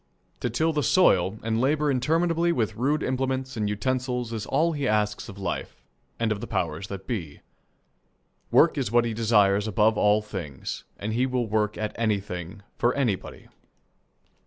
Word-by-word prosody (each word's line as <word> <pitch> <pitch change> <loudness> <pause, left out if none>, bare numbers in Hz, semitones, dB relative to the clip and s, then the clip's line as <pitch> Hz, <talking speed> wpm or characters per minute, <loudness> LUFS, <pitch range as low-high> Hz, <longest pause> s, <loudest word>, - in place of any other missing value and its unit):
To 125 - -1
till 160 +8 +1
the 150 - +1
soil 105 - +3
and 115 +1 0
labour 150 +2 +2
interminably 165 +6 +1
with 115 -10 -1
rude 145 +6 0
implements 130 0 -2
and 105 -2 -1
utensils 125 +2 -2
is 110 -2 -4
all 160 +5 +2
he 145 -4 -2
asks 105 -1 0
of 100 - -10
life 95 -9 -5 0.4
and 115 -1 +1
of 105 -1 -2
the - - -5
powers 85 +2 -2
that 95 -1 -7
be. 85 - -5 1.1
Work - - +4
is 100 - -2
what 120 0 +4
he 115 - -2
desires 105 -2 +3
above 110 +1 +2
all 105 +1 +4
things, 85 -10 -6
and 110 +2 -3
he 125 +3 +1
will 125 -2 0
work 105 -1 0
at 110 -1 -3
anything 100 -3 -2 0.2
for 120 +1 +2
anybody. 120 -9 -2
110 Hz, 165 wpm, -26 LUFS, 105-130 Hz, 1.1 s, Work